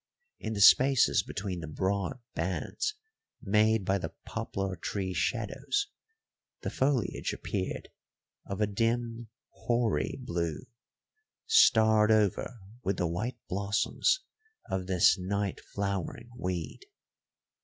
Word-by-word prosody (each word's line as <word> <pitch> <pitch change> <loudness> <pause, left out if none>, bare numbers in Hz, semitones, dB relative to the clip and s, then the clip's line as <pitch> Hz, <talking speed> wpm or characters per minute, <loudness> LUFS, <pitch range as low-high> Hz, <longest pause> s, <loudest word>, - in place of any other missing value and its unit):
In 110 - -4
the 100 - -2
spaces 130 +6 +6
between 95 -3 -4
the 80 - -6
broad 95 - -1 0.2
bands 95 - -2 0.4
made 110 0 +2
by 100 +1 +1
the - - -6
poplar 95 -1 -3
tree 95 +2 -3
shadows, 115 - -1 0.7
the - - -3
foliage 130 -6 0
appeared 95 -2 -4 0.6
of 100 +1 -4
a - - +5
dim, 115 +2 -1 0.2
hoary 115 -9 0
blue, 85 -2 -3 0.8
starred 110 - +5
over 110 +2 +1 0.2
with 95 0 0
the 90 - +1
white 105 +9 -2
blossoms 105 - +1 0.5
of 95 -1 -2
this 95 +1 +4
night 100 +1 -2
flowering 100 +4 -3
weed. 90 -7 -4
100 Hz, 110 wpm, -30 LUFS, 95-115 Hz, 0.8 s, spaces